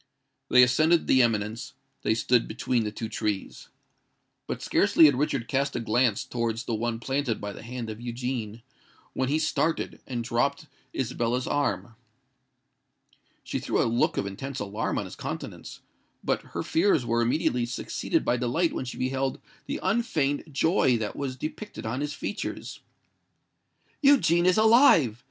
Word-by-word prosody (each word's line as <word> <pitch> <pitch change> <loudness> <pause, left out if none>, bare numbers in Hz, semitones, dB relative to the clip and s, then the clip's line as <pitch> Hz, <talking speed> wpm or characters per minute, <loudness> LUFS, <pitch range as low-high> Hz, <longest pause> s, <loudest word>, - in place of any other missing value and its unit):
They 125 - +7
ascended 155 +7 +3
the 130 - +5
eminence: 110 -1 -1 0.3
they 110 - +1
stood 120 +1 +2
between 115 +1 -1
the 105 - -2
two 110 +1 -5
trees. 105 -2 -3 0.8
But - - -4
scarcely 160 - +5
had 145 - +6
Richard 135 -3 -1
cast 140 +1 0
a - - 0
glance 115 -1 +1
towards 115 -1 -2
the 120 - -3
one 115 +1 -2
planted 130 -1 -1
by 105 0 -5
the - - -10
hand 120 0 -6
of 110 +1 -7
Eugene, 120 -2 -4 0.5
when 130 0 -1
he 150 - +2
started, 160 +1 -1
and 120 -3 -3
dropped 140 +6 0 0.3
Isabella's 125 0 -1
arm. 145 -5 -1 1.5
She - - -3
threw - - -1
a - - +3
look 115 +1 +1
of - - 0
intense 130 +8 -5
alarm 105 +1 -2
on - - -2
his - - -9
countenance; - - -7 0.4
but - - 0 0.2
her - - -1
fears 165 -7 +2
were 120 0 +1
immediately 120 -1 +1
succeeded 125 - -2
by 125 - +2
delight 125 +8 0
when - - -3
she 125 - -7
beheld 130 +1 -1 0.3
the - - -3
unfeigned 185 - 0
joy 140 -3 +3
that 110 -2 -4
was 135 -2 -3
depicted 155 - -6
on 125 +5 -2
his 145 0 -3
features. - - -5 1.2
"Eugene 185 - +4
is 185 - +4
alive! 220 - +5
125 Hz, 155 wpm, -27 LUFS, 115-145 Hz, 1.5 s, They